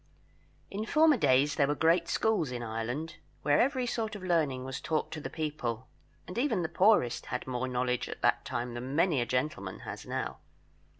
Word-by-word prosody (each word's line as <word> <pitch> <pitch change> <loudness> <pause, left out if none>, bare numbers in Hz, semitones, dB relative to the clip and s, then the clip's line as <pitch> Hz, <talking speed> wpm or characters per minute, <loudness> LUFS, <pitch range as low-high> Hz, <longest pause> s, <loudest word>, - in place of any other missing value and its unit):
In 205 +2 -3
former 310 -1 +5
days 145 - +3
there 140 - +2
were 145 - +1
great 165 +2 +3
schools 215 -10 +1
in 120 -1 -4
Ireland, 120 +9 -4 0.3
where 145 -1 +4
every 255 0 +1
sort 225 -2 -2
of 200 - -8
learning 155 -8 +1
was 130 0 -5
taught 155 -1 -1
to 155 - -5
the - - -5
people, 130 -6 -3 0.4
and 180 - -4
even 235 -9 +1
the 160 - -2
poorest 205 - +3
had 125 - -3
more 130 0 -2
knowledge 125 0 -1
at - - -8
that - - +3
time 120 0 -3
than 125 +3 -5
many 165 -5 +3
a 120 - -2
gentleman 125 -8 -2
has - - -7
now. - - -3
150 Hz, 190 wpm, -30 LUFS, 125-180 Hz, 0.4 s, former